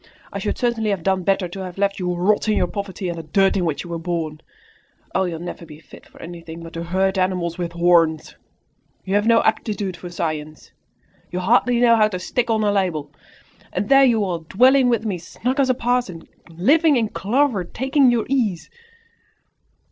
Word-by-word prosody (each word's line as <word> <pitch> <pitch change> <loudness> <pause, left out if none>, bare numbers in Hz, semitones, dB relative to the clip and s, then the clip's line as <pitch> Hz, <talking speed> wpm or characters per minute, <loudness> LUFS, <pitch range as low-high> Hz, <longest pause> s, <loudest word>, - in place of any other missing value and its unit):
I - - -3
should - - -2
certainly 235 -3 0
have 195 -5 -2
done 190 0 +1
better 195 0 0
to 175 +3 -9
have 185 -1 -7
left 200 0 0
you 180 - -2
to 180 - -1
rot 200 +5 +1
in 215 - +2
your - - +2
poverty 200 -2 -5
and 170 -1 -4
the - - -7
dirt 195 +5 +2
in 180 - 0
which 155 -4 -2
you 175 - -11
were 170 - -3
born. 165 -3 -4 0.7
Oh, 190 - +1
you'll 170 -2 -4
never 175 +1 -7
be 155 -2 -12
fit - - -16
for - - -19
anything 165 -1 -9
but 165 - -10
to 170 0 -5
herd 190 +2 0
animals 180 -2 -1
with 170 -1 -3
horns! 170 -2 +2 0.7
You 190 - -3
have 205 +2 +2
no 230 -1 +4
aptitude 205 -4 -1
for 175 +1 -9
science! 155 -3 -5 0.6
You 180 - -5
hardly 240 +5 +2
know 235 -1 +5
how 215 -1 +4
to 195 -4 -4
stick 235 +6 -2
on 220 -1 +1
a 205 - +2
label! 180 -7 -1 0.6
And 200 +3 -3
there 275 0 +7
you 230 -5 +3
are, 175 -3 -2
dwelling 250 - +3
with 230 -2 0
me 195 -5 -2
snug 250 - -3
as 265 -1 +3
a 255 - +3
parson, 240 -9 -2 0.2
living 285 - +3
in 225 -3 0
clover, 235 -1 0
taking 265 - +2
your 235 -2 +1
ease!" 220 -11 -1
190 Hz, 205 wpm, -21 LUFS, 170-230 Hz, 0.7 s, there